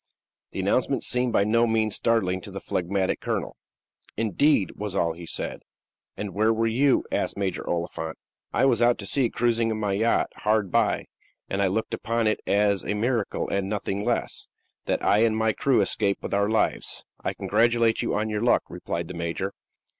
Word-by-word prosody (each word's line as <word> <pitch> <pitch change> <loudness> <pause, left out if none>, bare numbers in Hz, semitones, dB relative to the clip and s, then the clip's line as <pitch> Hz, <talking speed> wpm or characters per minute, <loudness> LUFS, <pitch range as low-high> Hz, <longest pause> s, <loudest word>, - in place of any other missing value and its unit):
The - - -6
announcement - - +1
seemed 125 0 +2
by 100 - +3
no 115 +3 +3
means 110 -2 +1
startling 95 -6 +1
to - - -9
the - - -6
phlegmatic 95 +1 -1
colonel. - - -3 0.6
"Indeed!" 110 - +2
was 105 -2 -5
all 85 -3 +1
he 85 0 -10
said. - - -4 0.6
"And 105 -3 -5
where 110 +3 +3
were 115 0 +1
you?" 130 +5 +3
asked - - -1
Major 95 -3 -2
Oliphant. 85 -2 -3 0.3
"I - - +2
was 120 -4 +3
out 120 0 +4
at 100 - -6
sea, 130 -4 +2
cruising 115 -1 +1
in 110 -1 -2
my 105 -2 0
yacht; 110 +4 +1
hard 105 -3 +1
by; - - +2 0.5
and 100 - 0
I 100 - +3
look 110 +4 -2
upon 115 0 -1
it 110 - +1
as 100 -1 +2
a 105 - -2
miracle, 115 0 -1
and 100 -1 -1
nothing 100 -1 -2
less, 120 +1 -2 0.4
that - - -1
I 105 - +4
and 110 -1 +3
my 110 0 +2
crew 130 -2 +2
escaped 100 0 0
with - - -4
our 100 +1 +2
lives." 110 - 0 0.2
"I - - -2
congratulate 115 +1 +2
you - - -1
on 105 +1 0
your 105 -1 -2
luck," 120 - +3
replied 85 -1 -4
the 90 - -7
major. 85 +3 -3
105 Hz, 190 wpm, -25 LUFS, 100-115 Hz, 0.6 s, out